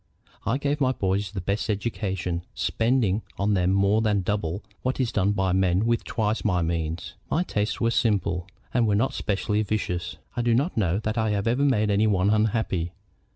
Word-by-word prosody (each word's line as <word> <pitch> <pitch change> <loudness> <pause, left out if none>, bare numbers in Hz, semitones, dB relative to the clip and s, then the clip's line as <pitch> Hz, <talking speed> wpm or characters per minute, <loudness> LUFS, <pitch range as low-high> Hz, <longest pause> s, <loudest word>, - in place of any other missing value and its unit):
I 115 - +2
gave 145 +1 -1
my 130 -1 +3
boys 95 -3 -1
the 100 -2 -4
best 100 +5 -2
education, 95 -5 -2
spending 115 -4 +1 0.2
on 100 +1 +1
them 90 -2 +2
more 100 +3 +3
than 105 -3 +1
double 100 -1 -2 0.2
what 130 +1 -1
is 125 -3 +1
done 100 -1 +2
by 95 -2 +1
men 95 +2 +2
with 115 0 +1
twice 110 -1 -1
my 90 -5 +1
means. 80 0 -2 0.2
My 170 - +1
tastes 105 -10 -1
were - - +1
all 115 - +3
simple, 100 -6 +1 0.3
and 120 -2 +3
were 105 - +3
not 115 +6 +1
specially 105 +1 0
vicious. 95 -4 -2 0.2
I 120 - 0
do 120 -1 +3
not 145 +9 0
know 95 -4 +1
that 110 +1 -2
I 110 -1 +1
have 100 -1 0
ever 120 +4 +1
made 110 -7 +2
any 105 +2 +3
one 100 -1 +2
unhappy. 105 -5 0
105 Hz, 200 wpm, -25 LUFS, 95-115 Hz, 0.3 s, my